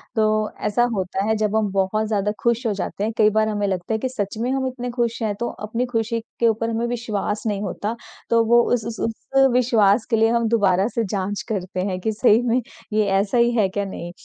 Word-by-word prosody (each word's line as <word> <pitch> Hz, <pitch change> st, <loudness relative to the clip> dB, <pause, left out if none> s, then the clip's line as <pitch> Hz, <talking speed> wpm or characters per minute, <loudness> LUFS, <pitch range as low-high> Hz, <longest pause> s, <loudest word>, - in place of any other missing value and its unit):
तो 215 Hz, -1 st, +2 dB, 0.2 s
ऐसा 210 Hz, +3 st, +2 dB
होता 190 Hz, 0 st, -2 dB
है 220 Hz, -, +3 dB
जब 215 Hz, 0 st, 0 dB
हम 215 Hz, -2 st, +1 dB
बहुत 195 Hz, +3 st, 0 dB
ज़्यादा 210 Hz, -1 st, 0 dB
खुश 235 Hz, +1 st, +1 dB
हो 215 Hz, -, +1 dB
जाते 195 Hz, +1 st, -4 dB
हैं, 220 Hz, +2 st, -1 dB
कई 215 Hz, -1 st, +5 dB
बार 215 Hz, +1 st, +2 dB
हमें 205 Hz, -1 st, -1 dB
लगता 185 Hz, +2 st, -2 dB
है -, -, +1 dB
कि 260 Hz, -, -2 dB
सच 205 Hz, -4 st, -4 dB
में 240 Hz, +3 st, -1 dB
हम 265 Hz, 0 st, 0 dB
इतने 250 Hz, -1 st, -5 dB
खुश 235 Hz, -1 st, -1 dB
हैं 215 Hz, -2 st, 0 dB
तो 240 Hz, -, -1 dB, 0.2 s
अपनी 235 Hz, +3 st, -1 dB
खुशी 230 Hz, -1 st, -1 dB, 0.2 s
के 235 Hz, -, +4 dB
ऊपर 225 Hz, +1 st, 0 dB
हमें 230 Hz, +1 st, -1 dB
विश्वास 220 Hz, -3 st, -3 dB
नहीं 205 Hz, -2 st, -1 dB
होता। 205 Hz, +3 st, -3 dB, 0.3 s
तो 230 Hz, -1 st, +4 dB
वो 235 Hz, +1 st, +5 dB
उस 230 Hz, -3 st, 0 dB
उस 230 Hz, -1 st, -6 dB
उस 270 Hz, +4 st, +1 dB
विश्वास 225 Hz, -4 st, +3 dB
के 230 Hz, -, +3 dB
लिए 225 Hz, 0 st, +4 dB
हम 235 Hz, 0 st, +1 dB
दोबारा 200 Hz, -4 st, +3 dB
से 230 Hz, -, +1 dB
जाँच 200 Hz, +1 st, -2 dB
करते 185 Hz, -3 st, -3 dB
हैं 185 Hz, -2 st, -2 dB
कि 220 Hz, -, 0 dB
सही 220 Hz, +1 st, +4 dB
में 240 Hz, +2 st, +2 dB, 0.3 s
ये 215 Hz, 0 st, +3 dB
ऐसा 200 Hz, +4 st, 0 dB
ही 235 Hz, 0 st, +4 dB
है 210 Hz, -3 st, +4 dB
क्या 200 Hz, +1 st, -2 dB
नहीं। 175 Hz, -3 st, -7 dB
220 Hz, 235 wpm, -22 LUFS, 205-235 Hz, 0.3 s, कई